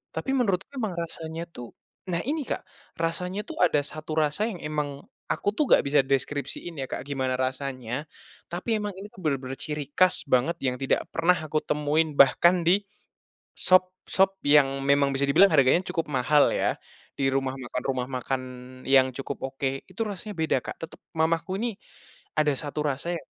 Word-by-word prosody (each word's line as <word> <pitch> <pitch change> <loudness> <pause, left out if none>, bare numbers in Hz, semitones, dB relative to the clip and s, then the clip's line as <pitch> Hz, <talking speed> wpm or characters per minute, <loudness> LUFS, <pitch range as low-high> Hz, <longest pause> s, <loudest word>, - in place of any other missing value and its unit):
tapi 270 - -2
menurutku 195 -7 +1
emang 220 -7 -2
rasanya 165 -1 -5
tuh 120 -7 -9 0.4
nah 170 - +1
ini 300 +4 -1
Kak 245 - -4 0.3
rasanya 180 +4 -1
tuh - - -7
ada 175 - +4
1 155 +1 -5
rasa 150 +6 +1
yang 190 -6 -6
emang, 150 -2 -3 0.3
aku - - 0
tuh 300 - +2
gak - - +6
bisa 145 0 +5
deskripsiin 140 +5 -2
ya 130 - -5
Kak - - -3
gimana 130 -2 -1
rasanya 130 0 -3 0.5
tapi 185 +6 -1
emang 210 0 -3
ini 200 - -7
tuh 190 - -13
bener-bener 135 -3 -1
ciri 150 -2 -3
khas 185 -5 +3
banget 135 +6 +2
yang 125 -1 +1
tidak 135 - +1
pernah 175 +2 +3
aku 155 0 -1
temuin 150 +2 +1
bahkan 175 +6 +6
di, 195 +4 +4 0.7
sop 185 0 +3 0.2
sop 195 0 +3
yang 135 -2 +4
memang 140 0 +3
bisa 140 +1 +1
dibilang 195 +8 +6
harganya 140 +4 +5
cukup 165 - -2
mahal 145 +2 +4
ya - - +1 0.5
di 135 - +2
rumah 135 -1 0
makan 125 0 -4
rumah 130 -2 -1
makan 130 +1 -2 0.5
yang 130 -1 +5
cukup 135 +1 -5 0.2
oke 135 0 -2
itu 185 +4 -7
rasanya 210 +1 -6
beda 160 -1 +1
Kak - - -7
tetep - - -15 0.2
mamaku 165 +4 0
nih, 235 -2 -2 0.6
ada 150 -1 +3
1 150 +2 -4
rasa 145 +5 -2
yang - - -18
150 Hz, 175 wpm, -26 LUFS, 135-180 Hz, 0.7 s, gak